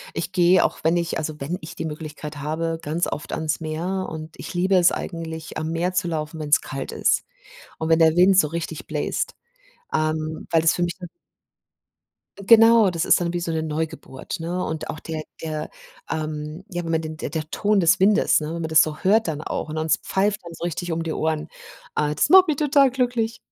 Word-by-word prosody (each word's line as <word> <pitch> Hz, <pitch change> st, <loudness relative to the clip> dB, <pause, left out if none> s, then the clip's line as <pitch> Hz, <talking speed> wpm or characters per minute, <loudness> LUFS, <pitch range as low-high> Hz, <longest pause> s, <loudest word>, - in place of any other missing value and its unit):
ich -, -, -3 dB
gehe 180 Hz, 0 st, +4 dB
auch -, -, -2 dB
wenn 165 Hz, +2 st, +3 dB
ich 170 Hz, -1 st, -1 dB
also, 155 Hz, -1 st, -4 dB
wenn 155 Hz, +6 st, -3 dB
ich 155 Hz, -, -9 dB
die -, -, -4 dB
Möglichkeit 150 Hz, -1 st, -7 dB
habe, 160 Hz, +3 st, -2 dB
ganz 160 Hz, +4 st, -1 dB
oft 150 Hz, -, -5 dB
ans 155 Hz, -1 st, -1 dB
Meer 170 Hz, +4 st, -3 dB
und 160 Hz, 0 st, -7 dB
ich -, -, -7 dB
liebe 185 Hz, +2 st, +2 dB
es 180 Hz, -1 st, +5 dB
eigentlich 160 Hz, -2 st, -6 dB
am 155 Hz, 0 st, -3 dB
Meer 175 Hz, +2 st, -1 dB
zu 180 Hz, -1 st, 0 dB
laufen, 160 Hz, -1 st, -4 dB
wenn 150 Hz, -1 st, -5 dB
es 150 Hz, -, +5 dB
kalt 135 Hz, 0 st, -6 dB
ist -, -, +1 dB, 0.5 s
und 160 Hz, -, -2 dB
wenn 160 Hz, 0 st, +4 dB
der 160 Hz, 0 st, +5 dB
Wind 185 Hz, +1 st, +6 dB
so 155 Hz, -5 st, +5 dB
richtig 165 Hz, -1 st, -5 dB
bläst, 150 Hz, -1 st, -2 dB, 0.6 s
ähm, 155 Hz, 0 st, -1 dB
weil 165 Hz, -1 st, +3 dB
das 165 Hz, -, +4 dB
für 175 Hz, -, -2 dB
mich 175 Hz, 0 st, -1 dB
dann 180 Hz, -, -8 dB, 1.4 s
genau 225 Hz, -2 st, +7 dB
das 170 Hz, -1 st, -1 dB
ist -, -, +5 dB
dann 170 Hz, -1 st, -2 dB
wie 175 Hz, -, -1 dB
so 170 Hz, -1 st, -3 dB
'ne 160 Hz, -1 st, -1 dB
Neugeburt, 155 Hz, 0 st, -5 dB
ne? 175 Hz, +3 st, -2 dB
Und 160 Hz, 0 st, -4 dB
auch 155 Hz, -, -8 dB
der 155 Hz, -1 st, -5 dB, 0.2 s
der, 155 Hz, -1 st, -4 dB, 0.4 s
ähm 155 Hz, +1 st, -4 dB
ja, 175 Hz, -2 st, -4 dB
wenn 165 Hz, -, -3 dB
man 160 Hz, -1 st, +1 dB
den 155 Hz, -1 st, -6 dB
der 155 Hz, -1 st, -4 dB
Ton 210 Hz, -1 st, +1 dB
des 180 Hz, +1 st, +4 dB
Windes, 205 Hz, +2 st, +4 dB
ne, 150 Hz, -, -3 dB
wenn 170 Hz, -, -4 dB
man -, -, -3 dB
das 160 Hz, 0 st, +6 dB
so 155 Hz, -1 st, -4 dB
hört 215 Hz, +3 st, +3 dB
dann 150 Hz, -2 st, -3 dB
auch 155 Hz, -, -4 dB
und 155 Hz, -, -5 dB
es 155 Hz, -1 st, +1 dB
pfeift 205 Hz, +2 st, 0 dB
dann 170 Hz, -, -9 dB
so 165 Hz, -, -9 dB
richtig 175 Hz, 0 st, -3 dB
um 165 Hz, 0 st, -1 dB
die 165 Hz, -1 st, -3 dB
Ohren. 155 Hz, 0 st, -1 dB, 0.5 s
Ah, 150 Hz, 0 st, +1 dB
das 150 Hz, -, +1 dB
macht 375 Hz, +2 st, +8 dB
mich 305 Hz, -3 st, 0 dB
total 280 Hz, -3 st, +4 dB
glücklich. 245 Hz, -3 st, -1 dB
165 Hz, 220 wpm, -23 LUFS, 155-180 Hz, 1.4 s, macht